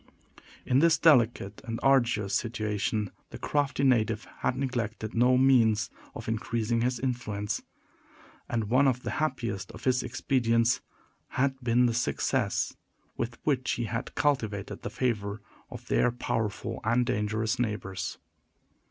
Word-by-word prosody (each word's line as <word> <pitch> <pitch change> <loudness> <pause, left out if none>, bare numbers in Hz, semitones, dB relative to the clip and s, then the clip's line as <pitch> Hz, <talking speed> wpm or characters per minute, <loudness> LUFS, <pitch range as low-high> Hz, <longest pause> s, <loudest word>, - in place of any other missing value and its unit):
In 125 - +3
this 165 +1 +5
delicate 120 -9 +3
and 115 -3 -4
arduous 120 -7 +3
situation, 105 -1 -1 0.2
the - - -8
crafty 145 -1 0
native 115 -4 +2
had 125 - 0
neglected 115 -5 -3
no 125 +2 +4
means 120 -5 +4 0.2
of - - -7
increasing 115 +1 -1
his 125 0 0
influence; 110 -5 -2 0.9
and 115 -2 0
one 130 +6 +3
of 125 -1 0
the - - -3
happiest 115 -10 -2
of - - -11
his 130 -1 +2
expedients 120 -1 +1 0.5
had 135 0 -1
been 120 +1 +3
the 120 - +2
success 120 +2 0 0.4
with 120 +1 -3
which 135 -3 +1
he 120 - -2
had 115 +4 -4
cultivated 110 -9 -1
the - - -4
favor 105 -5 -1 0.3
of - - -10
their - - +3
powerful 115 -1 -2
and 120 +3 +2
dangerous 105 +1 -1
neighbors. 95 -5 -3
115 Hz, 135 wpm, -28 LUFS, 110-125 Hz, 0.9 s, this